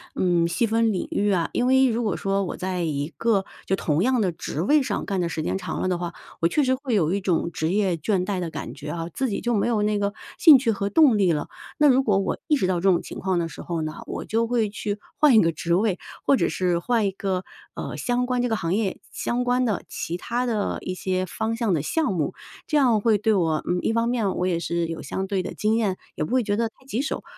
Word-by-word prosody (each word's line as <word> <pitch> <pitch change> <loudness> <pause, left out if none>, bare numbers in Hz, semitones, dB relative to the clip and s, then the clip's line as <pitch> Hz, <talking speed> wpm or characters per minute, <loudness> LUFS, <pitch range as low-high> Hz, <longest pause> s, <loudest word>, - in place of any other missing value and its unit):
嗯， 175 -2 +2
细 235 +8 +1
分 225 0 +2
领 185 - -2
域 205 0 +1
啊。 170 -3 +1
因 245 - +1
为 265 0 +5
如 235 0 0
果 205 -6 -1
说 195 0 0
我 180 - -4
在 185 -1 -2
一 145 -3 -1
个 215 -5 +1 0.2
就 190 - +2
同 155 -4 0
样 255 0 +2
的 190 -5 +1
职 160 -1 -4
位 295 +8 +4
上 - - -2
干 195 -2 -1
的 170 - -1
时 160 -1 -3
间 190 - -1
长 - - -4
了 - - 0
的 180 -1 0
话， 175 -1 -4 0.3
我 165 - +4
确 290 - +1
实 260 -1 +2
会 260 -3 -1
有 170 -4 +2
一 200 - -1
种 170 -2 0
职 160 - -1
业 195 -3 +1
倦 180 +3 0
怠 195 -1 -2
的 175 -2 -3
感 - - -6
觉 150 +1 -8
啊， 165 +1 -4
自 265 -2 -1
己 200 - -2
就 240 0 0
没 205 - +1
有 220 -3 +1
那 210 0 +1
个 200 0 -1 0.3
兴 315 -5 +9
趣 245 -3 +1
和 200 -1 -2
动 265 -2 +5
力 185 -4 +4
了。 150 -2 -1 0.3
那 300 - +5
如 265 -1 +5
果 210 -7 +2
我 195 - -1
意 300 - +4
识 230 - 0
到 185 0 +1
这 195 +3 +3
种 175 -2 +4
情 - - -8
况 190 -1 0
的 170 -1 0
时 165 - -9
候 170 -2 -3
呢， 155 0 -4
我 - - -5
就 230 +1 0
会 230 -3 +1
去 205 0 -3 0.2
换 295 -6 +5
一 215 - +8
个 165 - +2
职 170 +2 -1
位， 195 -1 +1 0.3
或 275 - +5
者 - - +1
是 180 -2 0
换 230 +3 +1
一 195 - +1
个， 190 -1 -2 0.3
呃， - - -5
相 245 0 0
关 250 0 0
这 245 - 0
个 225 - +1
行 170 -4 -1
业， 200 -2 -1
相 245 +1 -1
关 250 +1 +2
的 215 -6 -1
其 170 - -4
他 240 +7 -2
的 220 -4 -1
一 185 - -4
些 185 0 -1
方 220 +5 -2
向 225 -4 0
的 155 - +1
项 310 - 0
目， 155 -5 -1 0.3
这 305 - +2
样 245 -6 +4
会 220 -1 +3
对 215 +2 +2
我 165 -5 +1
嗯， 180 0 +1
一 - - 0
方 230 0 +1
面 225 -6 0
我 180 - 0
也 170 -2 0
是 170 0 -1
有 165 0 -5
相 190 0 -4
对 190 -1 0
的 - - -5
经 215 +1 +1
验， 205 -5 0 0.2
也 - - -2
不 155 - -4
会 255 -1 +3
觉 205 -1 0
得 230 0 +1
太 260 - -26
棘 260 -2 -2
手。 290 - -3
200 Hz, 295 characters per minute, -24 LUFS, 175-235 Hz, 0.3 s, 兴